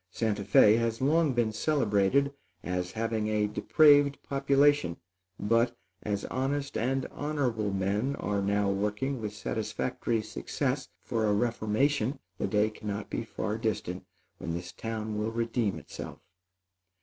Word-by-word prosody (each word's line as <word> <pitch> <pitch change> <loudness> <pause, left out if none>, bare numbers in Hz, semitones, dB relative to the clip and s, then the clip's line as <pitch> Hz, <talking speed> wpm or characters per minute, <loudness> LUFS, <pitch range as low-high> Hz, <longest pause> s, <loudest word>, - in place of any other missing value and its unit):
Santa 105 +1 -1
Fé 105 +2 +6
has 115 -1 -1
long 155 +3 +3
been 120 -2 +1
celebrated 135 +1 +2 0.3
as 90 0 -2
having 110 -1 -1
a 105 -1 +1
depraved 145 +6 +5
population; 140 -6 +2 0.4
but, 115 +3 +2 0.2
as 100 -1 -2
honest 140 +2 -2
and 130 +3 0
honorable 130 -9 -1
men 100 +8 0
are 100 -6 -1
now 100 +1 +1
working 105 +7 -1
with 105 -1 -3
satisfactory 105 - -2
success - - -2 0.2
for 110 -2 0
a 105 - +3
reformation, 115 +4 +1 0.2
the - - 0
day 105 +2 +2
cannot 105 -1 -5
be - - -2
far 105 +2 -3
distant 100 -5 -2 0.4
when 85 - -3
this 90 +1 -6
town 110 -1 -4
will 105 +1 0
redeem 115 -2 -1
itself. - - -8
110 Hz, 135 wpm, -29 LUFS, 105-135 Hz, 0.4 s, Fé